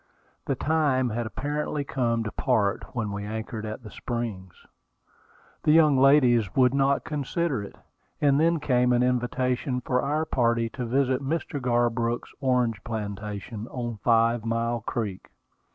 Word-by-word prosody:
The 135 Hz, -, 0 dB
time 140 Hz, -4 st, +1 dB
had 115 Hz, +1 st, -2 dB
apparently 145 Hz, +4 st, -3 dB
come 120 Hz, -4 st, 0 dB
to 110 Hz, -, -4 dB
part 110 Hz, -2 st, 0 dB
when 110 Hz, -4 st, -2 dB
we 100 Hz, 0 st, -4 dB
anchored 110 Hz, +1 st, -5 dB
at 110 Hz, +3 st, -6 dB
the 105 Hz, -, -10 dB
Springs. 110 Hz, -8 st, -5 dB, 1.0 s
The 150 Hz, -, +3 dB
young 155 Hz, -3 st, +6 dB
ladies 130 Hz, -7 st, +4 dB
would 130 Hz, -1 st, +4 dB
not 140 Hz, 0 st, +2 dB
consider 150 Hz, -, -2 dB
it; 100 Hz, -, -9 dB, 0.4 s
and 140 Hz, -1 st, +3 dB
then 165 Hz, +1 st, +3 dB
came 125 Hz, -3 st, +2 dB
an 120 Hz, 0 st, +3 dB
invitation 125 Hz, +1 st, 0 dB
for 125 Hz, 0 st, 0 dB
our 150 Hz, +3 st, 0 dB
party 115 Hz, -5 st, +1 dB
to 125 Hz, +1 st, -5 dB
visit 130 Hz, +1 st, +1 dB
Mr. 145 Hz, 0 st, -3 dB
Garbrook's 120 Hz, -1 st, 0 dB
orange 125 Hz, -5 st, +1 dB
plantation 105 Hz, 0 st, -5 dB
on 120 Hz, -3 st, -5 dB
Five 115 Hz, +1 st, +2 dB
Mile 115 Hz, +1 st, -1 dB
Creek. 110 Hz, -4 st, -4 dB
120 Hz, 145 wpm, -26 LUFS, 115-135 Hz, 1.0 s, young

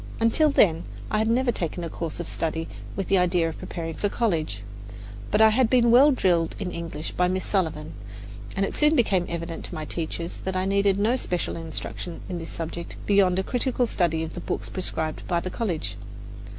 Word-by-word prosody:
Until 230 Hz, +7 st, +4 dB
then 175 Hz, -, +4 dB, 0.3 s
I 215 Hz, -, +2 dB
had 220 Hz, -, +2 dB
never 245 Hz, +2 st, +3 dB
taken 175 Hz, -4 st, -3 dB
a -, -, -2 dB
course 165 Hz, -1 st, -4 dB
of 175 Hz, -, -4 dB
study 160 Hz, 0 st, -2 dB, 0.3 s
with 195 Hz, -, -2 dB
the 195 Hz, -, +4 dB
idea 175 Hz, -2 st, +2 dB
of 160 Hz, -, -8 dB
preparing 165 Hz, -2 st, -5 dB
for 205 Hz, -, -1 dB
college; 160 Hz, -, -1 dB, 0.7 s
but 210 Hz, -, +3 dB
I 220 Hz, -, +8 dB
had 230 Hz, +1 st, +3 dB
been 235 Hz, -2 st, +4 dB
well 265 Hz, +5 st, +8 dB
drilled 175 Hz, -, +2 dB
in 185 Hz, -3 st, -3 dB
English 165 Hz, -2 st, -5 dB
by 180 Hz, -, +2 dB
Miss 185 Hz, +1 st, -1 dB
Sullivan, 160 Hz, -6 st, -1 dB, 0.6 s
and 195 Hz, -, +2 dB
it -, -, -4 dB
soon 300 Hz, +1 st, +4 dB
became 190 Hz, -, +2 dB
evident 170 Hz, 0 st, -4 dB
to -, -, -7 dB
my 155 Hz, -1 st, -4 dB
teachers 170 Hz, +2 st, -3 dB
that 190 Hz, 0 st, -4 dB
I 185 Hz, 0 st, +1 dB
needed 200 Hz, 0 st, +3 dB
no 215 Hz, +5 st, +2 dB
special 180 Hz, -8 st, -2 dB
instruction 165 Hz, +1 st, -5 dB
in 180 Hz, -2 st, -4 dB
this 165 Hz, -, -7 dB
subject 170 Hz, +1 st, -5 dB
beyond 195 Hz, -3 st, +4 dB
a 190 Hz, -, +1 dB
critical 250 Hz, +2 st, 0 dB
study 170 Hz, -7 st, 0 dB
of 160 Hz, -, -6 dB
the 175 Hz, -, -6 dB
books -, -, -3 dB
prescribed 160 Hz, -4 st, -2 dB
by 175 Hz, -, +1 dB
the 185 Hz, +2 st, -5 dB
college. 185 Hz, -9 st, -2 dB
180 Hz, 205 wpm, -25 LUFS, 165-215 Hz, 0.7 s, I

